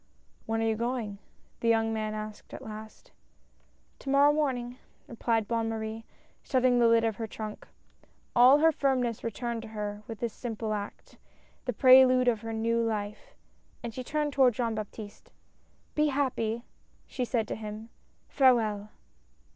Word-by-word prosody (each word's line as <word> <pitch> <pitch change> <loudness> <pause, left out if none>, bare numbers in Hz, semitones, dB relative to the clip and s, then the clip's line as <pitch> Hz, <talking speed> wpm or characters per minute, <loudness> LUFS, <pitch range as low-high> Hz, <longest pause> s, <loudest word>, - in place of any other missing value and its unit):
"When 225 0 0
are - - +1
you 220 -1 +1
going?" 230 -3 -3 0.4
the 230 - -2
young 225 -1 +3
man 215 -1 -2
asked 215 0 -7
at - - -9
last. 215 0 -10 0.9
"To 275 - -7
morrow 285 +2 +5
morning," 255 -5 -1 0.3
replied 225 -2 -1
Bonne 230 0 0
Marie, 220 0 -4 0.4
shut 260 -3 0
ting 250 -1 +4
the 235 - +5
lid 230 0 +4
of 225 -2 0
her 225 - -4
trunk. 215 0 -7 0.7
All 250 +4 +8
her 320 +2 +5
firmness 255 -6 0
returned 230 +1 -3
to 225 - -9
her 210 -1 -5
with 225 -2 -7
this 235 -2 -2
simple 225 -3 -4
act, 205 -1 -7 0.5
the 250 - -1
prelude 255 +1 +7
of 225 -3 +2
her 225 0 -5
new 230 +1 0
life, 210 -2 -4 0.5
and 235 -1 -5
she 255 - -5
turned 295 +2 -1
toward 255 -4 +4
Jean 230 -1 -1
Baptiste. 210 -1 -8 0.3
" - - -37
Be 300 0 +2
happy! 245 -5 -1 0.2
" - - -36
she 255 - -4
said 230 -3 -1
to - - -2
him. 215 +1 -7 0.4
Farewell 220 -6 +3
230 Hz, 165 wpm, -29 LUFS, 220-250 Hz, 0.9 s, All